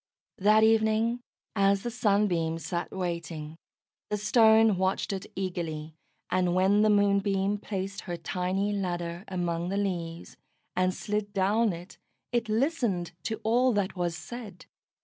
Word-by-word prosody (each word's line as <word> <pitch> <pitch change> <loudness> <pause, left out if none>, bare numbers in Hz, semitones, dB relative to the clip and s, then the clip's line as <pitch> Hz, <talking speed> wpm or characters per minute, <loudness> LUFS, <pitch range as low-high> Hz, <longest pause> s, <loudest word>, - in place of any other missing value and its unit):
That 215 +2 +5
evening, 220 +2 +3 0.3
as 195 -1 +3
the 240 - -3
Sunbeam 200 -8 +1
sat 170 +2 -4
waiting, 170 -4 -4 0.5
the 210 - 0
Stone 220 0 +5
watched 190 +1 0
it 190 -1 -5
eagerly, 165 -5 -4 0.4
and 180 -1 +2
when 195 +3 +4
the 215 - +4
Moonbeam 200 0 +2
placed 195 -1 -4
her 175 - -2
tiny 185 +4 -1
ladder 175 -2 -3
among 175 -2 -2
the 195 - -1
leaves, 175 -4 -3 0.4
and 185 0 +2
slid 205 +1 -3
down 210 +3 +2
it, 175 +2 -9 0.3
it 235 -2 0
listened 225 - 0
to 220 - -2
all 245 +3 +3
that 200 -2 -1
was 175 -2 -2
said. 225 -7 -9
195 Hz, 135 wpm, -28 LUFS, 175-215 Hz, 0.5 s, That